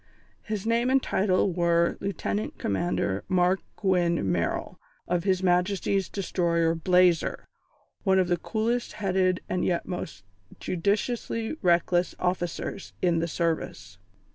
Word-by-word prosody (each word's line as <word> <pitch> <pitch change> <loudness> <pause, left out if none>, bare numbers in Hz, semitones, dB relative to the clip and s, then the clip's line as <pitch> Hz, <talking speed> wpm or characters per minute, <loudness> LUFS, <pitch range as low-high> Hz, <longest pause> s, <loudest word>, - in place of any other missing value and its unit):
His 215 -2 -4
name 235 +2 +2
and 270 +1 +4
title 190 -5 +1
were 170 -1 +2
Lieutenant 110 - -3
Commander 100 - -1
Mark 185 +1 +2 0.2
Gwynne 175 - +1
Merrill, 85 -1 -2 0.3
of 175 0 0
His 190 -1 +1
Majesty's 185 +1 +1
Destroyer 170 -4 0
Blazer, 180 0 +2 0.6
one 190 -2 +3
of 185 -2 +3
the 175 0 +1
coolest 235 +4 -2
headed 185 -2 +1
and 180 - -1
yet 170 -2 0
most 100 - -6 0.4
judiciously 220 - -1
reckless 175 0 +2
officers 180 +1 -3
in 170 -2 +3
the 165 - -1
Service. 165 0 -3
180 Hz, 120 wpm, -27 LUFS, 170-195 Hz, 0.6 s, and